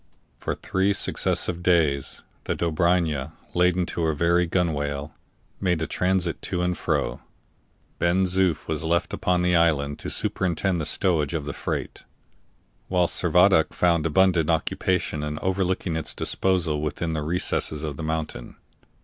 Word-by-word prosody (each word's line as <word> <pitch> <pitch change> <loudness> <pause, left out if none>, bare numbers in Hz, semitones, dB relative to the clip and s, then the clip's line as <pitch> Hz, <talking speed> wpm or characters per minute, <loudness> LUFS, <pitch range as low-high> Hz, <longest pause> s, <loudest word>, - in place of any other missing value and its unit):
For - - -4
three 95 +2 0
successive 90 -2 -1
days 80 -6 +1 0.2
the - - -1
Dobryna, 80 -3 0 0.2
laden 90 0 +2
to 85 - -3
her 80 -1 +1
very 85 +3 +2
gunwale, 75 -5 -1 0.5
made 90 -4 +1
a 80 - -1
transit 90 -1 0
to 90 -1 -2
and 90 0 0
fro. - - -1 0.8
Ben 90 +2 +2
Zoof 90 -3 +1
was 80 -1 -2
left 85 +1 0
upon 90 -1 +1
the 90 0 +2
island 75 -4 +2
to - - -5
superintend 90 -1 -1
the - - -2
stowage 85 -5 +1
of 75 -3 -3
the 75 - -4
freight, - - -4 0.9
whilst 90 -2 +1
Servadac 90 -1 +4
found 85 -2 +2
abundant 85 -1 +3
occupation 80 -1 0
in 75 0 -3
overlooking 95 -1 -1
its 80 - -1
disposal 85 -6 +1
within 80 +2 -2
the 80 - -2
recesses 80 -1 -1
of 75 -2 -3
the - - -7
mountain. 80 0 -4
85 Hz, 145 wpm, -24 LUFS, 80-90 Hz, 0.9 s, Servadac